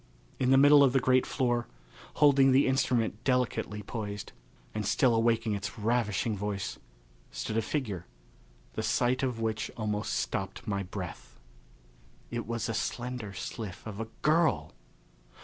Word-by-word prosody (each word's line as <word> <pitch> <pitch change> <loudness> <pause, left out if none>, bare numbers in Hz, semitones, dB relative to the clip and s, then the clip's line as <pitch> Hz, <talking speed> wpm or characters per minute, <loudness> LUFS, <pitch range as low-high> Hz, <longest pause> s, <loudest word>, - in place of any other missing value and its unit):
In 130 - +2
the 135 - +6
middle 145 +1 +8
of 130 -2 +4
the 135 - +4
great 130 0 +3
floor, 120 -2 0 0.5
holding 140 -2 +6
the 135 +2 +5
instrument 125 -4 +1
delicately 125 -5 0
poised, 105 -1 -5 0.4
and 110 - -2
still 120 +4 +3
awaking 115 -1 +2
its 100 +1 -4
ravishing 110 -1 0
voice, 100 -1 -3 0.5
stood - - -4
a 115 - +3
figure, 105 - -3 0.7
the - - -2
sight 125 +1 +1
of 125 -4 -1
which 110 -1 -1
almost 105 -2 -2
stopped 95 0 -3
my 100 -1 -1
breath. 90 -10 -7 0.9
It 120 -1 -3
was 115 -1 -2
a 115 - -2
slender 120 0 -3
sylph 95 +1 -6
of 110 -2 -7
a 115 - -3 0.2
girl! 160 +1 +2
115 Hz, 145 wpm, -30 LUFS, 105-125 Hz, 0.9 s, middle